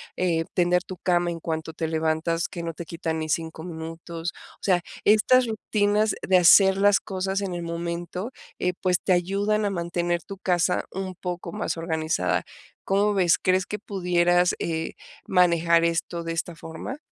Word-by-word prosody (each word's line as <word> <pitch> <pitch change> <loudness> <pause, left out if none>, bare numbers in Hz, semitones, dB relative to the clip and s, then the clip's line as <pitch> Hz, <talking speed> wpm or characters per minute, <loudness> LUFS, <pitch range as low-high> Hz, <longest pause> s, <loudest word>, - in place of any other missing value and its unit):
em, 165 -3 0
tender 180 0 +2
tu 185 -1 -8
cama 175 0 +1
en 165 - -5
cuanto 160 0 -4
te 160 0 -3
levantas, 160 +1 0
que 170 - -6
no 165 -1 -4
te 170 - -7
quitan 165 -1 -3
ni 155 0 -4
5 160 +1 -2
minutos. 165 0 -6 0.3
O - - -32
sea, 180 -3 +3 0.2
estas 235 +4 +5
rutinas 210 -1 +1
de 185 - +4
hacer 190 +2 +7
las 200 0 +5
cosas 190 0 -2
en 190 -3 -3
el 175 - -4
momento, 170 +5 -4 0.3
eh, 180 0 0
pues, 180 -1 +2
te 185 - +2
ayudan 200 +4 +1
a - - +1
mantener 175 -2 -1
tu 195 - -9
casa 180 -1 +1
un 190 -1 -5
poco 175 -1 -5
más - - -2
organizada. 160 - 0 0.4
¿Cómo 200 +2 +2
ves? 180 -4 +3
¿Crees 185 0 +1
que 210 - -5
pudieras 180 -3 +2
eh 160 -1 -2 0.3
manejar 170 -1 +4
esto 170 0 -1
de 165 - -3
esta 165 +1 -3
forma? 165 - -7
175 Hz, 170 wpm, -25 LUFS, 165-190 Hz, 0.4 s, hacer